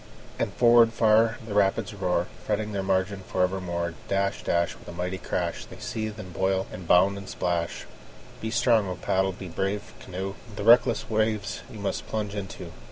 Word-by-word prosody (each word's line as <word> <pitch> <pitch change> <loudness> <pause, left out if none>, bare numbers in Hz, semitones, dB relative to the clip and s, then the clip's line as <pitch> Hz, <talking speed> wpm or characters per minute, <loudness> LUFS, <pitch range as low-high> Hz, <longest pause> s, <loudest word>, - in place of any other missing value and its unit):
And - - 0
forward 120 -1 +6
far 115 0 +4
the 110 - -5
rapids 105 +2 +2
roar, 90 -3 0 0.2
Fretting 105 0 -1
their 100 -1 -1
margin 95 +1 0
for 90 - +1
evermore. 90 -2 -1
Dash, 100 0 0
dash, 85 0 +1
With - - -17
a - - -6
mighty 90 +2 -3
crash, 85 -1 -2
They - - -12
seethe, 110 -1 -4
and 95 -4 -8
boil, 95 +2 +1
and 90 -2 -8
bound, 95 +3 +5
and 100 - -9
splash. 85 -2 -2 0.6
Be 110 - -2
strong, 115 -2 +3
O 90 - -3
paddle! 95 +2 +1
be 95 +1 -8
brave, 95 +4 -3
canoe! 95 +1 -5 0.2
The - - -4
reckless 120 +1 +5
waves 110 -1 0
you 110 - -9
must 100 -1 -3
plunge 105 -2 -2
into. 100 -2 -6
100 Hz, 180 wpm, -27 LUFS, 90-110 Hz, 0.6 s, forward